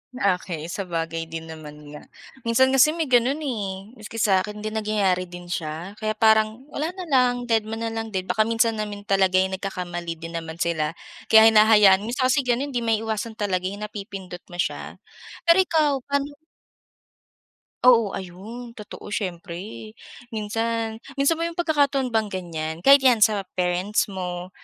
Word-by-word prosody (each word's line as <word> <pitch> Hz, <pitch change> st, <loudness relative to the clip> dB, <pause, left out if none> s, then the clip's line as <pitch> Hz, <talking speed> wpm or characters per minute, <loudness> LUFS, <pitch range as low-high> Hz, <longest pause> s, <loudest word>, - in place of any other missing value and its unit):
Okey. 180 Hz, -7 st, -1 dB
Sabagay 165 Hz, -3 st, -3 dB
din 160 Hz, 0 st, -7 dB
naman 155 Hz, -2 st, -10 dB, 0.2 s
nga, 150 Hz, -, -10 dB, 0.4 s
minsan 260 Hz, +3 st, +4 dB
kasi 285 Hz, +4 st, +5 dB
may 320 Hz, -5 st, -2 dB
ganun 255 Hz, +5 st, +3 dB
eh. 200 Hz, -6 st, -4 dB
Maski 215 Hz, +1 st, -10 dB
sa'kin 210 Hz, 0 st, +1 dB
din 215 Hz, -, -3 dB
nagyayari 195 Hz, -4 st, 0 dB
din 175 Hz, 0 st, -10 dB
siya. 170 Hz, +5 st, -5 dB
Kaya 215 Hz, 0 st, -2 dB
parang 220 Hz, +2 st, +3 dB
wala 300 Hz, -, -2 dB
na 375 Hz, -, -6 dB
lang, 250 Hz, -2 st, +3 dB
dedma 225 Hz, -2 st, 0 dB
nalang 225 Hz, 0 st, -3 dB
din, 185 Hz, -, 0 dB
baka 205 Hz, +4 st, +1 dB
minsan 225 Hz, -1 st, +1 dB
naman 205 Hz, -1 st, -5 dB
talaga'y 190 Hz, -1 st, +2 dB
nagkakamali 180 Hz, -3 st, -4 dB
din 165 Hz, +1 st, -8 dB
naman 160 Hz, -1 st, -8 dB
sila 165 Hz, -2 st, -1 dB, 0.3 s
kaya 220 Hz, 0 st, +8 dB
hinahayaan 210 Hz, -2 st, +6 dB
minsan 255 Hz, +3 st, -1 dB
kasi 280 Hz, -, +3 dB
ganun 255 Hz, +4 st, 0 dB
'di 245 Hz, -, -1 dB
maiiwasan 220 Hz, 0 st, -1 dB
talaga 185 Hz, -3 st, -1 dB
yung 200 Hz, +2 st, -6 dB
napipindot 195 Hz, -4 st, -7 dB
mo 175 Hz, -, -11 dB
siya. 175 Hz, -, -3 dB, 0.5 s
Pero 335 Hz, +1 st, +5 dB
ikaw, 310 Hz, -7 st, +2 dB
paano 280 Hz, +1 st, -2 dB, 1.5 s
Oo. 230 Hz, -4 st, +6 dB
Ayun, 210 Hz, +6 st, -9 dB
totoo 210 Hz, -1 st, -9 dB
siyempre. 190 Hz, +3 st, -5 dB, 0.4 s
Minsan 225 Hz, +1 st, -2 dB, 0.2 s
minsan 280 Hz, +4 st, +2 dB
bang 335 Hz, +1 st, -2 dB
may -, -, -26 dB
pagkakataon 285 Hz, -5 st, +1 dB
bang 220 Hz, -2 st, +1 dB
ganyan, 160 Hz, -4 st, -4 dB
kahit 275 Hz, +8 st, +8 dB
'yan 245 Hz, -4 st, +5 dB
sa 205 Hz, -2 st, +3 dB
parents 180 Hz, +4 st, 0 dB
mo, 180 Hz, -2 st, -5 dB
210 Hz, 155 wpm, -24 LUFS, 180-230 Hz, 1.5 s, kaya